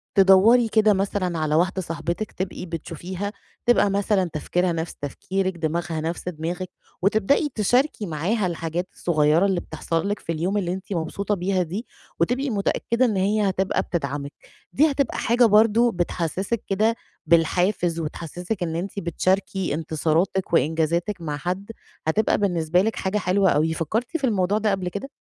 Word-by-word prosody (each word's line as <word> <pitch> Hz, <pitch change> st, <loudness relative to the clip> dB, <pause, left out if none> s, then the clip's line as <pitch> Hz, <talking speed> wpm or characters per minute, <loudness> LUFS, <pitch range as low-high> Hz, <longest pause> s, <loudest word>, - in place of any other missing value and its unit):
تدوّري 200 Hz, +5 st, +6 dB
كده 215 Hz, -1 st, +4 dB
مثلًا 190 Hz, -3 st, -1 dB
على 155 Hz, -1 st, 0 dB
واحدة 185 Hz, +3 st, +1 dB
صاحبتِك 170 Hz, +4 st, -4 dB
تبقي 185 Hz, 0 st, -5 dB
بتشوفيها 175 Hz, +4 st, -5 dB, 0.3 s
تبقى 240 Hz, -4 st, +4 dB
مثلًا 195 Hz, -2 st, +1 dB
تفكيرها 175 Hz, +3 st, 0 dB
نَفْس 165 Hz, 0 st, -3 dB
تفكيرِك، 185 Hz, +6 st, -3 dB
دماغها 165 Hz, 0 st, -2 dB
نَفْس 170 Hz, +3 st, -3 dB
دماغِك، 175 Hz, +2 st, -4 dB, 0.3 s
وتبدئي 220 Hz, -, +2 dB
تشاركي 245 Hz, +2 st, +1 dB
معاها 185 Hz, +5 st, -1 dB
الحاجات 170 Hz, +1 st, -3 dB
الصغيّرة 155 Hz, +1 st, +2 dB
اللي 190 Hz, -3 st, +1 dB
بتحصل 165 Hz, +4 st, -3 dB
لِك 205 Hz, -, -2 dB
في -, -, -5 dB
اليوم 175 Hz, +5 st, -1 dB
اللي 180 Hz, -3 st, -1 dB
أنتِ 190 Hz, +1 st, -6 dB
مبسوطة 200 Hz, +5 st, -2 dB
بيها 185 Hz, 0 st, 0 dB
دي، 190 Hz, +8 st, -5 dB, 0.3 s
وتبقي 255 Hz, -, +1 dB
متأكدة 230 Hz, +3 st, +1 dB
إن 220 Hz, -4 st, 0 dB
هي 205 Hz, +1 st, +2 dB
هتبقى 190 Hz, 0 st, 0 dB
بتدعمِك، 140 Hz, -3 st, -3 dB, 0.4 s
دي 305 Hz, +2 st, +4 dB
هتبقى 280 Hz, -2 st, -1 dB
حاجة 240 Hz, +1 st, +3 dB
برضو 225 Hz, +2 st, +5 dB
بتحسّسِك 180 Hz, +4 st, -2 dB
كده 215 Hz, +4 st, +2 dB, 0.3 s
بالحافز 170 Hz, +1 st, +2 dB
وتحسّسِك 175 Hz, +5 st, -4 dB
إن 165 Hz, -2 st, -3 dB
أنتِ 195 Hz, +4 st, -3 dB
بتشاركي 185 Hz, 0 st, 0 dB
إنتصاراتِك 160 Hz, +4 st, 0 dB
وإنجازاتِك 165 Hz, +5 st, +1 dB
مع 150 Hz, -3 st, -3 dB
حد، 185 Hz, +6 st, -4 dB, 0.4 s
هتبقى 210 Hz, +8 st, +2 dB
بالنسبة 175 Hz, -3 st, +2 dB
لِك 220 Hz, +3 st, 0 dB
حاجة 190 Hz, +2 st, -1 dB
حلوة 190 Hz, 0 st, +2 dB
أوي. 160 Hz, +2 st, +2 dB
فكرتِ 225 Hz, -, -2 dB
في 290 Hz, -, -14 dB
الموضوع 205 Hz, -4 st, +2 dB
ده 215 Hz, -1 st, +1 dB
قبل 185 Hz, -2 st, -1 dB
كده؟ 200 Hz, +9 st, -6 dB
185 Hz, 150 wpm, -23 LUFS, 165-205 Hz, 0.4 s, تدوّري